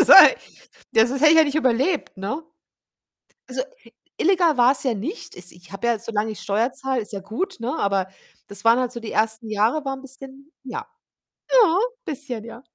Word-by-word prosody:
Ist - - +4
halt - - +10 0.6
ja, 220 +1 +5
sonst 265 +2 -3
hätte 305 0 +6
ich 325 - +6
ja 320 - +7
nicht 285 -1 -3
überlebt, 275 - 0
ne? 205 +12 -4 1.1
Also, - - -2 0.5
illegal 345 -5 +3
war's 250 +3 +3
ja 255 -4 0
nicht. 275 - -6
Es 180 0 -10
ich 175 0 -18
habe 195 +4 -4
ja 235 -2 +1
solang 220 0 -2
ich 215 - -7
Steuer 220 +5 0
zahle, 265 -3 -2
ist 210 - -8
ja 195 - -5
gut, 220 - -4
ne, 240 +3 -3
aber 195 -2 0 0.4
das 200 +1 -6
waren 230 +2 +5
halt 250 -1 -1
so 235 - -6
die 225 - -7
ersten 220 +1 0
Jahre 225 +8 +1
waren 270 0 -4
'n - - -17
bisschen 270 +3 -11
ja. 265 - -6 0.7
Ja, 430 -9 +5 0.3
bisschen, 260 -6 -5
ja. 235 +2 -11
245 Hz, 200 wpm, -22 LUFS, 215-285 Hz, 1.1 s, halt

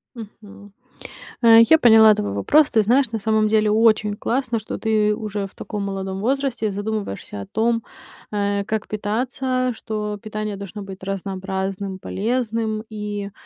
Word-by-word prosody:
Мгм. 205 -2 -12 0.7
А, 230 -1 +7
я 275 +8 +7
поняла 220 -2 +7
твой 100 - -3
вопрос. 285 - +3
Ты 220 - +4
знаешь, 245 +3 +2
на 225 - -1
самом 215 0 +2
деле 215 -1 +2
очень 215 -1 +3
классно, 235 +2 -1
что 215 - -6
ты 210 -1 +1
уже 210 -2 -4
в - - -23
таком 210 -2 -5
молодом 195 -1 -4
возрасте 255 -3 -1
задумываешься 205 - -4
о 100 - -7
том, 230 +1 0 0.5
э, 200 -1 0
как 220 0 -3
питаться, 250 +4 -1
что 210 -1 -4
питание 215 -1 -4
должно 200 +1 -8
быть 190 -1 -10
разнообразным, 190 0 -4
полезным 220 0 -2
и 205 -2 -5
215 Hz, 145 wpm, -21 LUFS, 200-225 Hz, 0.7 s, А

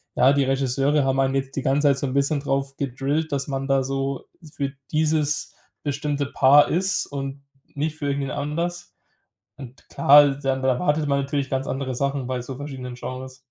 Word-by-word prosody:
ja, 135 +2 +5
die 140 -1 +3
Regisseure 135 +2 +1
haben 135 0 +1
einen 135 0 +1
jetzt 135 0 -2
die 140 - -1
ganze 140 +3 +2
Zeit 140 -1 +3
so - - -2
'n 130 - -3
bisschen 140 +1 +1
drauf 135 -1 -2
gedrillt, 140 +4 -2
dass 140 -1 -2
man 135 -1 -3
da 135 0 +3
so 135 0 -3 0.3
für 140 -1 -2 0.2
dieses 155 -1 0 0.3
bestimmte 145 0 -1
Paar 140 +1 +5
ist 185 +3 0
und 135 0 -6 0.3
nicht 150 +2 -2
für 145 -2 -4
irgendwen 140 -1 -1
anders. 170 +5 -3 0.6
Und 130 -2 -12
klar, 145 +1 +7
dann 135 -1 0
dann - - -5
erwartet 150 +4 +1
man 140 -1 +1
natürlich 140 0 -2
ganz 135 0 -2
andere 130 -1 -3
Sachen 140 0 -1
bei 125 -1 -3
so 130 +1 -7
verschiedenen 130 -3 -7
Genres. 130 +1 -7
140 Hz, 185 wpm, -23 LUFS, 135-145 Hz, 0.6 s, klar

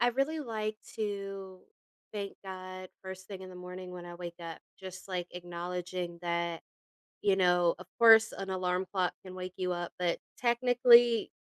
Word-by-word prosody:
I 240 - +5
really 275 +6 0
like 215 -5 -2 0.2
to 195 -3 -4 0.5
thank 200 -2 -3
God 185 0 -7
first 190 0 -7
thing 195 -2 -7
in 185 - -8
the - - -10
morning 180 0 -7
when 180 -1 -7
I 175 0 -8
wake 175 -1 -6
up, 165 -1 -6 0.2
just 190 0 -9
like, 180 -2 -2
acknowledging 175 0 -4
that, 170 -1 -1 0.6
you 195 -2 +4
know, 175 -2 +4
of 185 - -10
course, 225 -1 +8
an 195 0 -4
alarm 185 0 0
clock 180 -3 +2
can 185 -1 -8
wake 185 0 -6
you 180 -1 0
up, 175 -1 -3
but 175 -1 +1 0.2
technically, 240 -1 +6
185 Hz, 170 wpm, -32 LUFS, 180-210 Hz, 0.6 s, course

